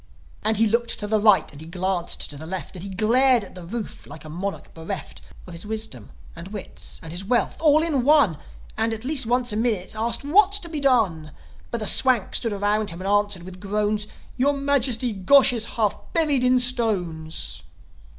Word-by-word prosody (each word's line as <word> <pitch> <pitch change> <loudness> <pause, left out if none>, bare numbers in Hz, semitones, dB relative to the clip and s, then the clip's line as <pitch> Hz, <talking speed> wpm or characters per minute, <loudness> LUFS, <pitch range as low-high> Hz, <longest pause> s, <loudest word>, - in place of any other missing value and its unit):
And 220 0 +1
he 225 - +4
looked 235 +2 0
to 210 - -5
the 215 +1 +1
right, 210 -2 +4
and 145 - -12
he 160 - -9
glanced 180 0 -2
to - - -8
the 155 +3 -9
left, 190 +2 -6
And 180 - -7
he 200 - -6
glared 235 +5 +3
at 195 - -12
the 180 - -10
roof 215 +5 -7
like 160 - -11
a - - -9
monarch 190 +5 -6
bereft 165 +4 -7 0.2
Of 180 - -11
his 170 - -7
wisdom 215 - -6 0.3
and 170 +2 -9
wits 205 0 -7
and 160 - -9
his 175 +3 -3
wealth 240 +4 0
all 310 -1 +4
in 295 -7 0
one; 275 - +4 0.4
And, 225 +1 0
at 220 +3 -10
least 270 -4 +1
once 245 -1 +1
a - - -3
minute, 220 -5 -1
asked, 230 +4 -2
"What's 395 +7 +5
to 340 - -7
be 315 -2 -4
done?" 195 - +1 0.4
But 235 - -4
the - - -1
Swanks 245 -3 +4
stood 230 - -3
around 205 +1 0
him 170 - -6
and 190 - -5
answered, 205 -3 +1
with 185 0 -10
groans, 210 +1 -1 0.3
"Your 275 +3 +2
majesty, 265 -4 +1
Gosh 255 +8 +5
is 230 -2 0
half 215 -3 0
buried 300 -6 +1
in 255 0 +4
stones!" 195 -11 +1
215 Hz, 205 wpm, -23 LUFS, 185-250 Hz, 0.4 s, What's